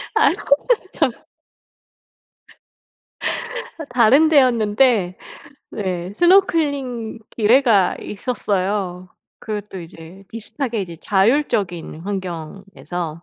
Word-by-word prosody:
아이고 280 Hz, -, +3 dB
거참. 375 Hz, -, +1 dB, 2.7 s
아 315 Hz, -, -6 dB
다른 250 Hz, +6 st, +5 dB
데였는데. 230 Hz, -, +3 dB, 0.5 s
네. 185 Hz, -3 st, -4 dB
스노클링 285 Hz, -, +2 dB
기회가 225 Hz, -4 st, +4 dB
있었어요 195 Hz, -4 st, -2 dB, 0.3 s
그것도 210 Hz, -3 st, -6 dB
이제 170 Hz, +3 st, -12 dB
비슷하게 230 Hz, +1 st, -4 dB
이제 170 Hz, -3 st, -8 dB
자율적인 195 Hz, -, 0 dB
환경에서. 175 Hz, -2 st, -6 dB
210 Hz, 195 characters per minute, -20 LUFS, 185-255 Hz, 2.7 s, 다른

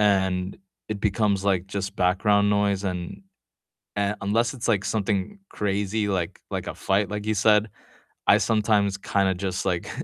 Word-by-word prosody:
and 95 Hz, -2 st, +1 dB, 0.3 s
it 105 Hz, -2 st, -4 dB
becomes, 100 Hz, -1 st, +1 dB
like, 95 Hz, -2 st, +1 dB
just 95 Hz, -1 st, -4 dB
background 100 Hz, +3 st, +3 dB
noise, 100 Hz, -1 st, +1 dB
and, 90 Hz, -, -4 dB, 0.7 s
uh, 100 Hz, +1 st, +1 dB
unless 115 Hz, +5 st, +1 dB
it's 120 Hz, -2 st, -4 dB
like 105 Hz, -3 st, +2 dB
something 105 Hz, -, -1 dB
crazy 105 Hz, +1 st, -1 dB
like 90 Hz, -4 st, -2 dB
like -, -, -3 dB
a -, -, -8 dB
fight, 100 Hz, 0 st, 0 dB
like 105 Hz, 0 st, -4 dB
you 110 Hz, -, +1 dB
said, 105 Hz, +1 st, +4 dB, 0.6 s
I -, -, +8 dB
sometimes 105 Hz, -3 st, +2 dB
kinda 100 Hz, -1 st, +1 dB
just, 95 Hz, 0 st, -3 dB
like 90 Hz, -3 st, -1 dB
100 Hz, 155 wpm, -25 LUFS, 95-105 Hz, 0.7 s, I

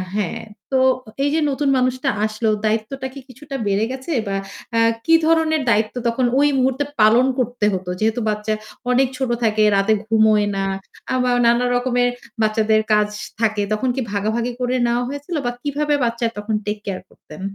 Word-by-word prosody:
হ্যাঁ। 205 Hz, -5 st, -2 dB, 0.3 s
তো 265 Hz, -, +3 dB, 0.5 s
এই 285 Hz, -, +2 dB
যে 320 Hz, -, +2 dB
নতুন 280 Hz, +1 st, 0 dB
মানুষটা 255 Hz, +2 st, 0 dB, 0.2 s
আসলো, 215 Hz, +1 st, -1 dB, 0.2 s
দায়িত্বটা 225 Hz, +5 st, -1 dB
কি 275 Hz, -, -8 dB
কিছুটা 275 Hz, +3 st, -9 dB
বেড়ে 200 Hz, +2 st, +1 dB
গেছে? 265 Hz, +5 st, -6 dB, 0.2 s
বা 195 Hz, -, -1 dB, 0.4 s
আ -, -, +4 dB, 0.3 s
কি 330 Hz, -, +4 dB
ধরনের 320 Hz, -1 st, +3 dB
দায়িত্ব 215 Hz, +1 st, +1 dB
তখন 245 Hz, +2 st, +1 dB
ওই 290 Hz, -, +5 dB
মুহূর্তে 265 Hz, +2 st, +1 dB, 0.2 s
পালন 230 Hz, +4 st, +6 dB
করতে 245 Hz, -3 st, 0 dB
হত? 185 Hz, -1 st, -4 dB
যেহেতু 225 Hz, +2 st, +1 dB
বাচ্চা 210 Hz, +1 st, -1 dB, 0.4 s
অনেক 260 Hz, +1 st, +3 dB
ছোট 265 Hz, -2 st, -1 dB
থাকে, 215 Hz, -1 st, +2 dB
রাতে 195 Hz, +2 st, +3 dB
ঘুমোয় 220 Hz, -1 st, +3 dB
না। 195 Hz, -, -1 dB, 0.5 s
আবা 250 Hz, -1 st, +1 dB, 0.2 s
নানা 235 Hz, +1 st, +3 dB
রকমের 245 Hz, 0 st, +1 dB, 0.3 s
বাচ্চাদের 215 Hz, 0 st, +2 dB
কাজ 210 Hz, 0 st, +3 dB, 0.3 s
থাকে। 215 Hz, -2 st, +1 dB
তখন 250 Hz, +4 st, 0 dB
কি 265 Hz, -, -1 dB
ভাগাভাগি 220 Hz, +4 st, -1 dB
করে 250 Hz, 0 st, 0 dB
নেওয়া 240 Hz, +1 st, +1 dB
হয়েছিল? 285 Hz, +4 st, -5 dB
বা 245 Hz, -, +1 dB
কিভাবে 295 Hz, +1 st, 0 dB
বাচ্চার 235 Hz, 0 st, 0 dB
তখন 210 Hz, +1 st, -2 dB
take 210 Hz, 0 st, -3 dB
care 185 Hz, -2 st, -4 dB
করতেন? 155 Hz, +4 st, -14 dB
235 Hz, 170 wpm, -20 LUFS, 215-260 Hz, 0.5 s, পালন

